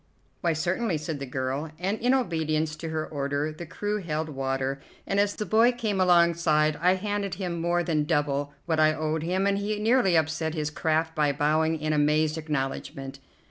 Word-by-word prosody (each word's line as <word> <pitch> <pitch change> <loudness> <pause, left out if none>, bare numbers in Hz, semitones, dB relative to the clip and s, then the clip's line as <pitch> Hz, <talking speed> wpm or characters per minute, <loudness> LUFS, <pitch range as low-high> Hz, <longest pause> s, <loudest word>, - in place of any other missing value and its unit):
"Why, 170 -3 +1
certainly," 175 +4 0
said 150 0 -4
the 140 - -5
girl, 130 +4 -3
and 195 +5 -2
in 250 +3 +3
obedience 160 - 0
to 165 +1 -5
her 155 0 -2
order 145 +1 -2
the 165 +2 -9
crew 205 +5 -2
held 155 -2 -3
water, 135 -1 -2 0.3
and 195 - 0
as 205 0 +2
the 210 - -3
boy 225 +3 +4
came 220 -6 -1
alongside 170 -4 +4
I 180 +2 +4
handed 200 -1 -2
him 175 -3 -3
more 175 +1 +1
than 155 -4 0
double 145 -2 0
what 160 -2 0
I 155 0 +4
owed 155 0 -1
him, 185 +4 0
and 200 0 +2
he 210 +1 -2
nearly 210 -5 +3
upset 160 0 0
his 150 -1 -2
craft 160 +1 0
by 150 -2 +2
bowing 155 +2 +1
in 155 0 -1
amazed 150 +1 +2
acknowledgment. 135 -2 -4
160 Hz, 185 wpm, -27 LUFS, 150-185 Hz, 0.3 s, boy